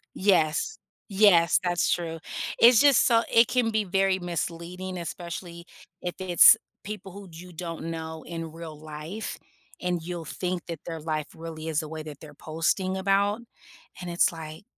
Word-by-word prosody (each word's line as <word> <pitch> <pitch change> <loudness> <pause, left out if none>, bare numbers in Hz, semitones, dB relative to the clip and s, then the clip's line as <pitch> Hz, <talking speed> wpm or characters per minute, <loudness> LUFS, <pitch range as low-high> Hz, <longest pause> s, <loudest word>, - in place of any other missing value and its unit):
Yes, 185 - +2 0.3
yes, 195 -5 +5
that's 175 -1 +1
true, 165 -2 -2 0.4
it's 235 -1 +7
just 285 -3 +6
so 230 -1 +4
it 230 +1 +6
can 245 -2 +1
be 220 -1 +1
very 195 0 +1
misleading, 175 +1 -4
especially 170 0 -7 0.4
if 175 - -3
it's 180 -2 +7 0.3
people 200 -2 -7
who 200 0 -10
you 175 +2 -11
don't 165 -1 -6
know 160 -1 -6
in 165 -1 -6
real 165 -2 -9
life 155 +7 -6 0.4
and 180 -2 -1
you'll 170 0 -5
think 180 +3 -3
that 165 -3 -6
their 165 -1 -4
life 155 -1 -2
really 160 -1 -7
is 155 -1 0
the 155 - -6
way 155 0 -6
that 150 -2 -9
they're 150 -2 -12
posting 165 +5 -1
about, 200 +3 +1 0.6
and 180 -1 -5
it's 170 +1 +3
like 160 +2 -9
175 Hz, 160 wpm, -26 LUFS, 160-190 Hz, 0.6 s, it's